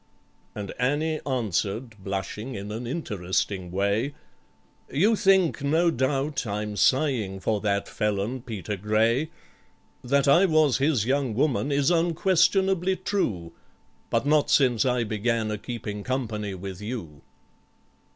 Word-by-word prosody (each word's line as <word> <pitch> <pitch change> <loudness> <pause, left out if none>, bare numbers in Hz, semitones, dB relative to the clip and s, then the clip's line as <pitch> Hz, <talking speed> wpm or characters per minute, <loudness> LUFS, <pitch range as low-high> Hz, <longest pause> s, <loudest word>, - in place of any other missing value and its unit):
And 100 -2 -5
ANNIE 150 +5 0
answered, 110 -2 -2
blushing 100 +5 -4
in 100 +1 -6
an 115 +3 -5
interesting 95 - -2
way, 100 +9 0 0.8
"You 200 +11 +3
think, 190 -7 +3
no 165 +4 +3
doubt, 135 0 -1
I'm 105 0 -3
sighing 120 -7 +1
for 105 +2 -1
that 100 -1 0
felon 105 +4 -2
PETER 105 -5 -5
GRAY: 110 - +1 0.7
That 140 +3 +2
I 175 +8 +6
was 155 -6 +3
his 135 -6 +2
young 130 -3 0
woman 140 +2 +1
is 140 +2 +2
unquestionably 180 +2 +2
true, 110 - -2 0.6
But 115 +3 0
not 150 0 +3
since 125 -4 +3
I 125 -2 +1
began 110 +1 -1
a 105 - -3
keeping 105 -2 -6
company 110 -6 -3
with 95 +1 -7
you." 105 - -6
120 Hz, 125 wpm, -26 LUFS, 105-145 Hz, 0.8 s, I